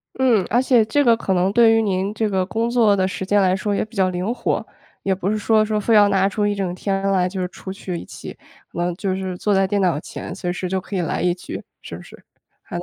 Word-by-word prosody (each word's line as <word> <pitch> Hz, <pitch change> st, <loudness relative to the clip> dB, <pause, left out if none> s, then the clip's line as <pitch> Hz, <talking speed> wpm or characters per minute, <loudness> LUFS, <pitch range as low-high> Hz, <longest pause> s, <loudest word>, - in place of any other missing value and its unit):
嗯， 240 Hz, -7 st, +3 dB
而 240 Hz, +3 st, +3 dB
且 245 Hz, -4 st, +4 dB
这 290 Hz, +6 st, +2 dB
个 230 Hz, -1 st, +5 dB
可 195 Hz, -, -2 dB
能 185 Hz, +2 st, +1 dB
对 225 Hz, +1 st, +5 dB
于 225 Hz, -, +3 dB
您 195 Hz, 0 st, -1 dB
这 220 Hz, 0 st, 0 dB
个 190 Hz, -2 st, 0 dB
工 225 Hz, +3 st, -1 dB
作 220 Hz, -4 st, +4 dB
的 185 Hz, -1 st, +1 dB
时 190 Hz, 0 st, -4 dB
间 205 Hz, +1 st, +3 dB
来 185 Hz, 0 st, +3 dB
说 205 Hz, +1 st, -1 dB
也 -, -, 0 dB
比 220 Hz, +2 st, -18 dB
较 190 Hz, -1 st, +3 dB
灵 180 Hz, +6 st, -2 dB
活， -, -, -2 dB, 0.4 s
也 195 Hz, -, +1 dB
不 190 Hz, +1 st, -2 dB
是 215 Hz, -, 0 dB
说 215 Hz, +1 st, +3 dB
说 215 Hz, 0 st, -1 dB
非 220 Hz, +2 st, +1 dB
要 205 Hz, -1 st, +6 dB
拿 195 Hz, 0 st, +2 dB
出 205 Hz, +1 st, -1 dB
一 205 Hz, -, 0 dB
整 190 Hz, -3 st, -3 dB
天 195 Hz, +1 st, -2 dB
来 180 Hz, -1 st, +2 dB
就 190 Hz, +1 st, -5 dB
是 180 Hz, -, -1 dB
出 190 Hz, +1 st, -8 dB
去 185 Hz, -2 st, -6 dB
一 -, -, -8 dB
起， -, -, -10 dB, 0.4 s
可 -, -, -8 dB
能 175 Hz, 0 st, 0 dB
就 195 Hz, -2 st, -2 dB
是 185 Hz, -1 st, -4 dB
坐 205 Hz, +2 st, 0 dB
在 195 Hz, 0 st, +3 dB
电 200 Hz, +1 st, 0 dB
脑 170 Hz, -6 st, +1 dB
前， -, -, -8 dB
随 175 Hz, -, -3 dB
时 180 Hz, 0 st, -4 dB
就 190 Hz, 0 st, -1 dB
可 195 Hz, +1 st, -6 dB
以 -, -, 0 dB
来 170 Hz, -, -2 dB
一 175 Hz, -1 st, +1 dB
局， 180 Hz, -, -8 dB, 0.2 s
是 -, -, -8 dB
不 -, -, -11 dB
是？ -, -, -16 dB, 0.4 s
还 -, -, -7 dB
能 175 Hz, -, -4 dB
195 Hz, 305 characters per minute, -21 LUFS, 185-215 Hz, 0.4 s, 要